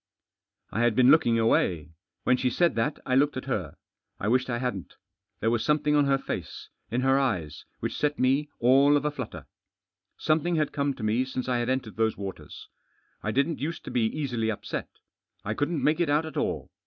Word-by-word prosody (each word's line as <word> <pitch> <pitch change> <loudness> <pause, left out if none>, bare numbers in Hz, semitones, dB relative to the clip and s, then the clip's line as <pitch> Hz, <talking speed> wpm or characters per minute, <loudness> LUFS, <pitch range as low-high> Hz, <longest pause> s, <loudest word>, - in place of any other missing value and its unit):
I - - -2
had 120 -2 +3
been 130 +2 +6
looking 120 -7 +4
away. 85 -8 +1 0.3
When 125 - +4
she 125 0 0
said 170 +7 +2
that 115 +6 -1
I 130 - -1
looked 145 +1 +3
at 130 - -5
her. 95 - -3 0.4
I 105 - -1
wished 130 +2 +2
I 120 - 0
hadn't" 120 -7 -4 0.5
There 115 - +2
was 115 -1 0
some 150 0 +3
thing 150 0 +1
on 145 -1 +4
her 135 0 +3
face - - -6
— - - -50
in 120 +4 -1
her 135 +1 +3
eyes— 90 - -2 0.2
which - - -3
set 150 0 0
me 135 +3 +2
all 135 +4 +5
of 145 - -3
a 150 - +1
flutter, 130 -6 -7 0.7
Something 160 +3 +1
had 155 -2 0
come 140 -1 0
to 110 - -8
me 110 +4 +2
since 130 -1 -4
I 125 -1 +1
had 120 +1 -1
entered 130 -5 -2
those 110 -1 +1
waters. 100 -2 -8 0.5
I 110 - -3
didn't 140 +8 0
use 165 +4 -3
to - - -8
be 120 -2 +1
easily 120 -5 -2
Upset. 110 - -4 0.6
I 110 - -1
couldn't 145 +6 -1
make 155 +2 +2
It 170 -4 +1
out 150 +2 +2
at 155 - -8
all. - - -2
130 Hz, 215 wpm, -27 LUFS, 115-145 Hz, 0.7 s, been